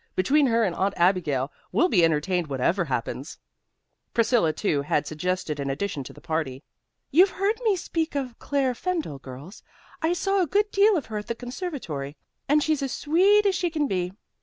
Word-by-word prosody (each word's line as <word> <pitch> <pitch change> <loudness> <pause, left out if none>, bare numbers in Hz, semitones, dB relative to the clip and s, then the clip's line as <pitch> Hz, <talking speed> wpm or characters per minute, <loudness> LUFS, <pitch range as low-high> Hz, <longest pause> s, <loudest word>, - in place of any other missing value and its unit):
Between 280 +10 +3
her 230 -1 +3
and 190 -5 0
Aunt 195 +1 0
Abigail 165 -7 +2 0.2
we'll 355 - +3
be 180 - +3
entertained 165 +2 +1
whatever 145 +7 0
happens." 125 -5 -4 0.8
Priscilla, 230 -7 +3
too, 155 -4 0
had 150 +1 0
suggested 155 0 -2
an 140 -1 -2
addition 145 0 -3
to - - -8
the - - -14
party. 155 -5 -3 0.5
"You've 360 +7 +6
heard 405 +5 -1
me 430 -4 +3
speak 330 -3 -3
of 255 -4 -3
Claire 275 -3 0
Fendall, 320 - -3
girls. 135 +9 -10 0.4
I 320 +2 +2
saw 390 +2 +1
a 350 - +1
good 415 +5 +1
deal 405 0 +4
of 290 - -3
her 215 -1 -4
at 210 - -9
the 235 - -2
conservatory, 245 - -5 0.3
and 295 +1 +4
she's 305 0 +1
as 270 -2 -2
sweet 385 +10 +3
as 395 - +3
she 360 -1 0
can 310 -2 0
be. 180 -6 -1
225 Hz, 185 wpm, -25 LUFS, -, 0.8 s, You've